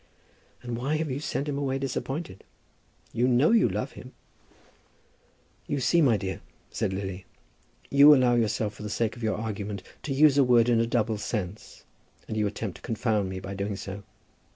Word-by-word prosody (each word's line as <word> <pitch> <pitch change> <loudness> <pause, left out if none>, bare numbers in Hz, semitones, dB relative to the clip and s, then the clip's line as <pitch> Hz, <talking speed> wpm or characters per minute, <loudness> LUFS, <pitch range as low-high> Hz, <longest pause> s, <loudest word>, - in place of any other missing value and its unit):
"And 120 -1 -4
why 135 +6 -1
have 155 -2 -2
you 130 - -2
sent 145 -1 -3
him 140 -1 -2
away 135 -2 -1
disappointed? 135 - -4 0.7
You 120 +2 +2
know 130 - +4
you 225 - +4
love 105 +3 -3
him." - - -12 1.5
"You 145 - -1
see, 170 +6 +3
my 125 -8 +4
dear," 95 0 -5 0.3
said - - -1
Lily, 95 -1 -5 0.6
"you 145 +2 +8
allow 125 -2 +3
yourself, 110 -2 0
for - - -13
the 105 - -5
sake 110 +1 -1
of 120 - -11
your 110 -1 0
argument, 105 -3 -4 0.2
to 145 - -5
use 145 +1 +5
a - - +7
word 120 -2 +4
in 115 -1 +3
a 115 - +1
double 110 -2 0
sense, 105 -1 -5 0.4
and - - -4
you 105 -1 +1
attempt 100 -1 -5
to - - -21
confound 110 -4 -1
me 95 0 -5
by 95 +1 -7
doing 100 +1 -3
so. 95 +1 -7
115 Hz, 185 wpm, -27 LUFS, 100-135 Hz, 1.5 s, you